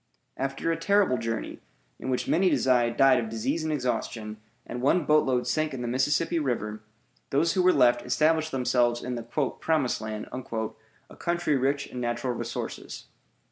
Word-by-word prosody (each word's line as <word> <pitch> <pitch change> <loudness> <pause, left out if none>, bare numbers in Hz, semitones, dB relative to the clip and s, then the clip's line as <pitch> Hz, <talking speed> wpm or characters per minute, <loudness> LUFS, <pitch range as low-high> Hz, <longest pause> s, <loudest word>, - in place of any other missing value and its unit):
After 135 +4 -2
a 165 - -1
terrible 200 - +2
journey, 115 0 -4 0.4
in - - -5
which 125 - -1
many 185 +3 +3
died 120 -2 +2 0.2
of 115 -2 -3
disease 135 +9 -2
and 155 - -1
exhaustion, 115 -5 -2 0.3
and 120 +1 -5
one 150 +5 +2
boatload 135 -5 +3
sank 155 -2 0
in 125 - -5
the - - -3
Mississippi 145 +7 +1
River, 110 -7 -2 0.5
those 155 +5 +2
who 185 - +2
were 180 0 +5
left 120 -6 +4
established 160 0 +2
themselves 125 -2 +1
in 125 - -3
the 120 - -3
"Promised 140 +3 -1
Land," 110 -1 -5
a 115 -3 -7
country 170 -3 0
rich 135 +2 0
in 125 - -7
natural 120 +1 -1
resources. - - -6
130 Hz, 160 wpm, -27 LUFS, 120-155 Hz, 0.5 s, were